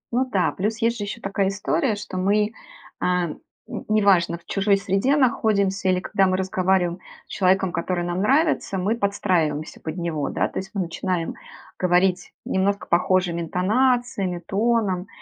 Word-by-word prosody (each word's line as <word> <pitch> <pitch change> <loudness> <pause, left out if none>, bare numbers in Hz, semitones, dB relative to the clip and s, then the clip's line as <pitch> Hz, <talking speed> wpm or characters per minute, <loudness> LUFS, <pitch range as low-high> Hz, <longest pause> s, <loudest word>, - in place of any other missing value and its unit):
Ну 255 +2 +2
да, 190 -2 +2
плюс 210 +4 -2
есть 230 +1 +1
же 205 - -2
еще 205 +3 -6
такая 195 0 0
история, 210 - 0
что 205 -2 -7
мы, 210 +3 +2 0.5
а, 180 -1 +1
н - - -8 0.5
не 215 0 +3
важно, 170 -4 +3
в 170 - -24
чужой 200 0 +2
среде 195 +8 +1
находимся 205 -8 +1
или 185 0 +2
когда 195 0 +2
мы 185 - +1
разговариваем 185 -1 0 0.3
с - - -16
человеком, 190 -1 +2
который 175 +1 -2
нам 175 +1 -2
нравится, 275 - +2
мы 195 +5 0
подстраиваемся 180 -8 -1
под 160 +2 -5
него, 160 -5 -2
да, - - 0
то - - -4
есть 190 - -7
мы 200 - 0
начинаем 175 0 -2 0.5
говорить 180 0 +2
немножко 200 +1 0
похожими 175 -1 +1
интонациями, 205 +1 0
тоном. 205 -3 0
190 Hz, 160 wpm, -23 LUFS, 180-210 Hz, 0.5 s, не